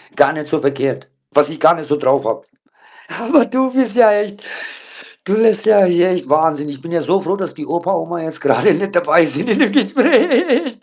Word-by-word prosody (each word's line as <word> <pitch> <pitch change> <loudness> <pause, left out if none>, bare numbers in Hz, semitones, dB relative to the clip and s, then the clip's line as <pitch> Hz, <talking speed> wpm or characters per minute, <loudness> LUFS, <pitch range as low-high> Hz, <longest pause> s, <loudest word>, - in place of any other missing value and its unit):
gar 145 0 +3
nicht 150 -1 -7
so 155 - -1
verkehrt, 140 -2 -3 0.3
was 145 +1 +3
ich 155 - -9
gar 160 +2 +4
nicht 155 -3 -9
so 150 - -1
drauf 140 -1 0
habe. - - -3 0.8
Aber 285 -6 +3
du 260 +1 -1
bist 250 -4 +1
ja 225 -3 +6
echt 205 0 -4 0.8
du 190 - -2
lässt 220 -1 +2
ja 210 -3 +5
hier 175 +1 +2
echt, 175 -7 -4
Wahnsinn. 150 -1 0
Ich 140 -2 -10
bin 170 - -10
ja 170 -1 -1
so 190 +5 0
froh, 190 +3 -2
dass 185 -3 -6
die 150 -1 -9
Opa, 170 +3 -3
Oma 170 -2 -4
jetzt 160 -1 -7
grade 140 - +2
nicht 200 -1 -4
dabei 170 -1 +3
sind 160 +8 -1
in 215 - +1
dem - - +3
Gespräch. 265 -1 +1
175 Hz, 215 wpm, -16 LUFS, 155-220 Hz, 0.8 s, ja